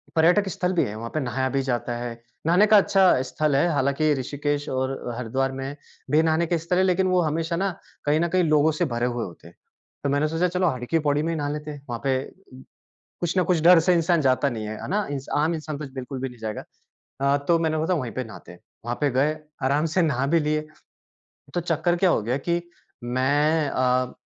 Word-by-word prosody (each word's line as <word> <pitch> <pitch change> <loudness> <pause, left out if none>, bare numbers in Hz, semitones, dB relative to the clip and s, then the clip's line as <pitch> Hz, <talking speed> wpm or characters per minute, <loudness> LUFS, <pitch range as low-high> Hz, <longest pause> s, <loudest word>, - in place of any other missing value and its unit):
पर्यटक 175 +5 +4
स्थल 180 +1 -1
भी 175 - +2
है, 105 - -4
वहाँ 115 +2 -6
पे 155 - 0
नहाया 130 -1 -1
भी 135 0 0
जाता 120 -2 -2
है, 120 0 -4 0.3
नहाने 180 +5 +5
का 210 0 +7
अच्छा 190 -8 +4
स्थल 150 +2 -1
है, 140 +6 +3
हालाँकि 145 +2 +2
ऋषिकेश 145 +2 -2
और 130 0 -1 0.2
हरिद्वार 130 +2 -1
में 135 +1 -5 0.4
भी 155 +2 +5
नहाने 160 +1 +2
के 170 - +1
स्थल 170 +2 -1
हैं, 185 - +4
लेकिन 185 0 +2
वो 185 -1 +3
हमेशा 165 +2 -1
ना 195 +3 0 0.4
कहीं 150 +1 +3
न 170 - +2
कहीं 185 +1 +2
लोगों 155 -1 +3
से 175 - +3
भरे 120 +1 0
हुए 120 -1 -2
होते 85 -2 -12
हैं, 85 - -17 0.5
तो 140 - 0
मैंने 145 +2 +2
सोचा 165 +3 +1
चलो 180 +1 0
हर 125 -6 -2
की 165 +6 +1
पैड़ी 150 -1 +1
में 165 - -1
ही - - -3
नहा 145 -1 -2
लेते 150 +1 -5
हैं 145 -2 -10
वहाँ 120 -1 -3
पे 135 -1 +2 1.1
कुछ 175 +2 -1
ना 185 - +4
कुछ 175 -1 +1
डर 175 0 +8
से 180 +3 +3
इंसान 170 -1 +2
जाता 135 +1 +2
नहीं 110 -4 -5
है। 110 - -5
है - - -6
ना? 210 +1 0
इंसान 140 0 -2
आम 165 +2 +1
इंसान 155 -2 -5
तो 150 - -6
बिल्कुल 130 0 -6
भी 135 - -2
नहीं 125 -1 -15
जाएगा 110 -1 -5 0.6
अ, 140 +1 +3
तो 155 +4 +1
मैंने 160 -1 0
बोला 165 +4 +1
था 170 - 0
वहीं 120 -4 -5
पे 130 - -3
नहाते 110 -5 -11
हैं। 90 - -16 0.2
वहाँ 120 +1 -2
पे 145 -1 +2
गए, 140 +5 +1 0.3
आराम 140 +4 +2
से - - +5
नहा 135 -5 +1
भी 165 +3 +3
लिए 155 0 -1 0.9
तो 175 - 0
चक्कर 170 +1 0
क्या 185 +1 +3
हो 115 - +2
गया 125 +4 0
कि 170 0 +2 0.4
मैं 145 +5 +1
अ 125 -1 +1
150 Hz, 235 wpm, -24 LUFS, 130-165 Hz, 1.1 s, डर